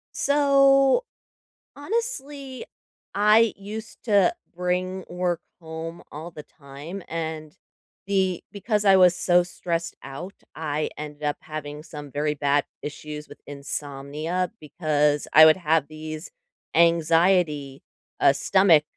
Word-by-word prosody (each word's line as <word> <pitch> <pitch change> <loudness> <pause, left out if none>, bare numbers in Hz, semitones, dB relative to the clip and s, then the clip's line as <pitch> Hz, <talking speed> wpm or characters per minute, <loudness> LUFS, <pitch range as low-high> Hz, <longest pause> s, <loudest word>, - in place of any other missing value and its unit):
So, 275 - +4 0.7
honestly, 290 - -3 0.5
I 210 +2 +4
used 215 +3 -8
to 205 - +4 0.2
bring 180 +1 -2
work 175 -1 -1 0.2
home 165 0 -7
all 160 +4 -8
the 150 - -10
time, 145 +8 -10
and 160 -1 -5 0.5
the 190 -3 0
because 210 +1 -1
I 195 - +7
was 180 -1 +6
so 175 0 +3
stressed 170 -2 -4
out, 165 +8 -8 0.2
I 155 -1 -2
ended 150 0 -8
up 145 0 -1
having 150 -1 -7
some 150 -3 -9
very 150 +1 -1
bad 145 0 +2 0.2
issues 150 0 -7
with 145 - -14
insomnia, 145 +4 -4
because 150 -2 0
I 155 - +10
would 155 +1 +6
have 160 -4 +1
these 155 +1 -7 0.5
anxiety, 165 -3 +3 0.4
uh, 135 - +5
stomach, 180 -1 +4
165 Hz, 115 wpm, -24 LUFS, 150-195 Hz, 0.7 s, I